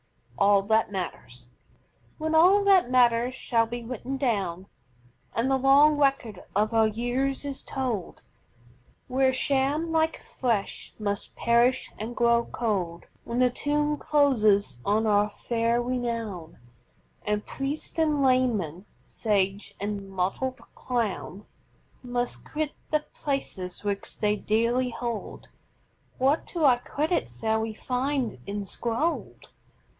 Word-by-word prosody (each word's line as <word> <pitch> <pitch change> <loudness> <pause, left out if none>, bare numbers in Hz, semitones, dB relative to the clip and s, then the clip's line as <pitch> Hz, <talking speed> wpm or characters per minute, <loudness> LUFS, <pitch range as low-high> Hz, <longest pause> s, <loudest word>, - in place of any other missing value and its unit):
A. - - +4
G._ - - +5
ALL 200 -1 +5
THAT 220 +1 +2
MATTERS 125 -10 -6 0.7
When 315 0 -2
all 370 +6 +6
that 385 -9 +5
matters 245 0 +3
shall 230 -3 +1
be 240 +1 -5
written 255 +3 -5
down 200 -9 -1 0.7
And 240 +4 +1
the 270 - +4
long 280 +3 +5
record 270 -9 0
of 215 +3 +1
our 225 -1 +4
years 245 +6 -1
is 280 -1 -4
told, 245 -8 -4 0.8
Where 260 +1 +2
sham, 280 +5 0
like 320 0 +1
flesh, 230 -6 -3
must 205 -2 -3
perish 235 +2 +2
and 225 +3 -5
grow 235 0 +3
cold; 185 -7 -2 0.2
When 235 - -3
the 250 0 +4
tomb 295 +3 0
closes 215 - +2
on 215 +2 +1
our 210 -1 +3
fair 230 +2 0
renown 230 -8 -3 0.7
And 210 0 -1
priest 280 +4 -4
and 300 -3 +2
layman, 220 - +1 0.2
sage 200 -2 -1
and 200 -1 -4
motleyed 195 +8 -2
clown 210 -4 -3 0.6
Must 245 -1 -3
quit 305 -1 -3 0.2
the 305 -1 0
places 195 -11 -4
which 200 -1 -4
they 210 -1 +1
dearly 230 +4 +1
hold, 235 -2 -5 0.7
What 275 +4 +2
to 340 -3 -3
our 255 -4 +5
credit 305 - -1
shall 220 - -1
we 220 0 -3
find 255 - -2
enscrolled? 225 - -3
235 Hz, 125 wpm, -27 LUFS, 210-270 Hz, 0.8 s, all